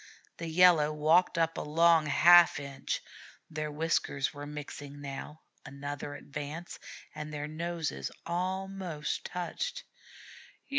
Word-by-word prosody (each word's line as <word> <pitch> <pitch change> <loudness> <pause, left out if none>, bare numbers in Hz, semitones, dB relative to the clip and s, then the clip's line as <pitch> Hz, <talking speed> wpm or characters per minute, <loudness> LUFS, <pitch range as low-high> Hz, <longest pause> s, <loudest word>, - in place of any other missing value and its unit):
The 170 - -5
Yellow 165 -2 +5
walked 155 +4 +3
up 165 0 +1
a - - -2
long 165 +1 +4
half 170 +3 +7
inch; 140 -1 -4 0.5
their 155 -1 -3
whiskers 150 -3 0
were 145 0 -7
mixing 145 -1 -8
now; 145 +2 -7 0.2
another 145 +1 -6
advance, 145 +4 -7 0.3
and 150 0 -6
their 150 0 -4
noses 165 +1 -3 0.2
almost 185 -2 -3
touched. 335 - -4
155 Hz, 110 wpm, -30 LUFS, 145-170 Hz, 0.5 s, half